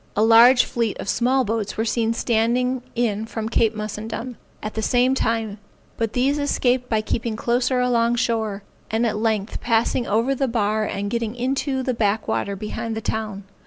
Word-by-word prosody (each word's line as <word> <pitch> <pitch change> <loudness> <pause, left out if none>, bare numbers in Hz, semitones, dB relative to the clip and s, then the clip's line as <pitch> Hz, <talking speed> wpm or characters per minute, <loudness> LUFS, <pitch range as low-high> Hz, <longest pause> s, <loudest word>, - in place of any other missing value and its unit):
A 215 - +4
large 235 +3 +7
fleet 230 -3 -2
of - - -6
small 255 +3 +2
boats 220 -1 -2
were 220 - 0
seen 225 0 0
standing 240 +2 +1
in 220 -2 0
from 220 -1 -4
Cape 225 -1 +1
Mussundum, 220 +3 -5 0.3
at 215 - -4
the 220 - -2
same 250 +3 +3
time; 225 -4 -1 0.4
but 225 -2 -2
these 275 +4 +1
escaped 250 -3 +1
by 220 -1 +1
keeping 230 +1 -2
closer 245 +3 +1
along 240 -1 +2
shore, 220 -4 -1 0.3
and 225 +2 +1
at 215 -2 0
length 215 -2 -1
passing 235 +1 +1
over 230 +6 +1
the 270 0 0
bar 215 -2 0
and 200 0 -3
getting 235 -1 -2
into 265 +2 -1
the 255 - 0
back 215 -2 0
water 200 - -1
behind 220 +2 -4
the - - -3
town. 215 -2 -3
230 Hz, 180 wpm, -22 LUFS, 215-245 Hz, 0.4 s, large